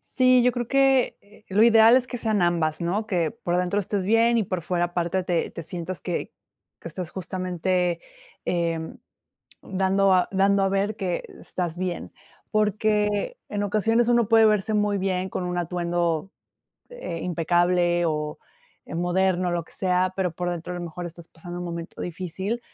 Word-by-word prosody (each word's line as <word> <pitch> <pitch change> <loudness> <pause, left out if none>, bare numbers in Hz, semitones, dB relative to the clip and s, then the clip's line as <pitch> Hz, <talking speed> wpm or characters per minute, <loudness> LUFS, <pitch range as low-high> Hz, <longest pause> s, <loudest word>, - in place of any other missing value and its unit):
Sí, 255 -1 +5
yo 250 - +4
creo 245 -1 -3
que, 270 0 +3
eh, 210 +1 -21
lo 205 +3 +4
ideal 225 0 +7
es 255 -1 +1
que 250 - -4
sean 215 -4 +1
ambas, 165 -3 +1
¿no? 195 +6 -1
Que 175 -6 0
por 220 -6 -4
adentro 180 +3 +1
estés 200 -1 -1
bien, 230 +3 +4
y - - +2
por 185 -2 -3
fuera 175 +1 0
aparte 175 +1 -1
te 175 -2 -1
te 170 - -7
sientas 175 +2 -5
que 175 - -4 0.5
que - - -7
estás 175 +1 -6
justamente, 180 -1 -1 0.4
em, 165 -2 -2 0.7
dando 195 +1 +2
a 180 - +3
dando 195 0 +3
a - - +2
ver 200 +2 0
que 185 -4 -2 0.2
estás 175 -2 -4
bien. 180 -2 -4 0.4
Porque, 210 - +1
en 205 -1 -2
ocasiones, 225 +3 +2
uno 235 -2 +4
puede 225 -1 +6
verse 215 0 +2
muy 205 -1 +1
bien 190 -1 -1
con 185 - -4
un 180 0 -2
atuendo, 175 0 -1 0.6
eh, - - -6
impecable, 175 0 +2
o, 150 -1 -2 0.5
eh, - - -7
moderno, 180 0 +1
lo 170 - -1
que - - -21
sea, 185 0 +1
pero 185 -3 0
por 175 +1 -3
dentro, 175 +1 -5
a - - -4
lo 175 - -5
mejor, 175 +1 -6
estás 170 0 -11
pasando 175 +2 -9
un - - -4
momento 170 -1 -6
difícil. 185 +6 -4
185 Hz, 175 wpm, -25 LUFS, 175-210 Hz, 0.7 s, ideal